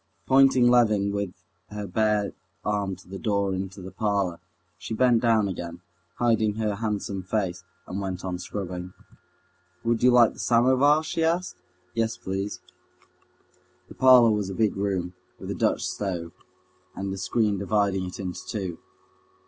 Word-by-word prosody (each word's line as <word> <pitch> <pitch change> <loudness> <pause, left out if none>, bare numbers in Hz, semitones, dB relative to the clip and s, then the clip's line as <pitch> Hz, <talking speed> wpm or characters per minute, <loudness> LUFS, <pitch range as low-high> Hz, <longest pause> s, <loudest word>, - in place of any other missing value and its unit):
Pointing 135 -2 +5
Levin 110 -5 +4
with 100 -2 -2 0.4
her 105 0 -5
bare 105 +1 +1 0.3
arm 100 -2 -1
to 90 - -18
the 95 +1 -7
door 100 -3 0
into 95 0 -5
the 95 - -8
parlor, 100 -3 -1 0.4
she 90 +6 -5
bent 120 -1 +4
down 115 -3 +3
again, 85 -2 -6 0.3
hiding 110 -3 +2
her 105 -2 -1
handsome 105 -3 -2
face, 95 -2 -2 0.2
and 95 +2 -5
went 95 -1 -4
on 90 -1 -3
scrubbing. 90 -1 -5 0.9
"Would 115 0 +1
you 125 - +6
like 120 -2 +6
the - - -15
samovar?" 130 +6 +4
she 165 +1 -2
asked. 170 +3 0 0.4
"Yes, 115 +1 -1
please." 95 +2 -4 1.3
The - - -10
parlor 125 -3 +7
was 105 -2 -1
a 95 - -5
big 110 -1 +1
room, 95 -3 -2 0.2
with - - -6
a - - -1
Dutch - - 0
stove, 90 -5 -4 0.6
and 95 0 -3
a - - -5
screen 100 +1 0
dividing 100 -1 +1
it 90 - -8
into 90 -2 -4
two. 95 -6 -4
100 Hz, 155 wpm, -26 LUFS, 95-115 Hz, 1.3 s, parlor